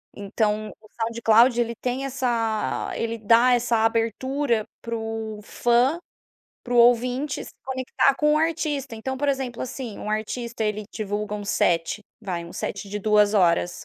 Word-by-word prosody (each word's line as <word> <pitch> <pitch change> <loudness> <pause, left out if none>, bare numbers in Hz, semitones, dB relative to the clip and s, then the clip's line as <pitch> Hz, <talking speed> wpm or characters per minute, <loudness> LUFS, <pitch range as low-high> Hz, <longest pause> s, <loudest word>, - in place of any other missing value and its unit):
Então 210 +1 -1
o 215 - -18
SoundCloud, 230 +1 +4
ele 235 -1 0
tem 255 +2 -2
essa 235 -5 -1
ele 230 0 -2
dá 230 +3 +5
essa 240 -1 +2
abertura 230 +2 0 0.2
para 230 0 -4
o 225 -1 -4
fã 240 +9 +2 0.7
para 245 0 -3
o - - +3
ouvinte 245 +4 +3
se - - -11
conectar 260 +1 +1
com 300 +1 +3
o - - +3
artista. 305 -5 -1
Então, 265 +4 -4
por 290 +2 -1
exemplo, 265 -3 -2
assim, 250 -3 -6
um 210 - -5
artista, 225 +2 -3
ele 210 0 -2
divulga 210 0 -3
um 205 -1 -5
set, 175 0 +1 0.2
vai 180 -5 -4
um 170 - -11
set 200 0 -5
de 210 - -3
2h. 205 -4 +2
230 Hz, 155 wpm, -24 LUFS, 215-255 Hz, 0.7 s, dá